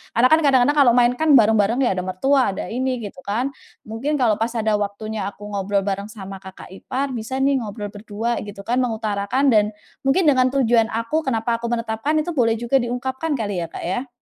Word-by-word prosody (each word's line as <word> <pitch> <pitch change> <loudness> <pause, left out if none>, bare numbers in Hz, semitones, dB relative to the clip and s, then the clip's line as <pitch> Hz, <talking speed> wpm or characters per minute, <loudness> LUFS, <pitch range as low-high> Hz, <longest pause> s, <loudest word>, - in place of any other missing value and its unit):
Karena 240 +2 +5
kan 315 - +6
kadang-kadang 280 -1 +3
kalau 245 -4 +6
main 245 -1 +5
kan 315 -2 +5
bareng-bareng 220 +1 +4
ya 245 - +2
ada 180 - -1
mertua, 255 +5 +2
ada - - -5
ini 255 +1 -2
gitu 200 -3 -8
kan. 240 +7 -1 0.3
Mungkin 230 +8 -3
kalau 220 -4 +2
pas 230 +1 -1
ada 220 -2 +1
waktunya 205 0 -4
aku 205 +1 -9
ngobrol 200 0 -1
bareng 200 0 -3
sama 195 -2 -9
kakak 190 -1 -12
ipar, 265 +8 -4
bisa 235 +1 -5
nih 275 0 +2
ngobrol 210 -2 -6
berdua 220 +3 -3
gitu 200 -1 -8
kan, 245 +5 0
mengutarakan 225 +2 0
dan 210 -2 +4 0.4
mungkin 295 +8 +3
dengan 260 -5 +4
tujuan 235 -4 +3
aku 230 +7 -1
kenapa 230 -2 0
aku 235 - -4
menetapkan 230 +5 -1
itu 345 +3 -4
boleh 230 -2 +3
juga 240 +4 +1
diungkapkan 260 +5 -2
kali 205 -7 -2
ya - - -9
Kak - - -8
ya? 215 +10 -2
230 Hz, 205 wpm, -21 LUFS, 205-260 Hz, 0.4 s, kan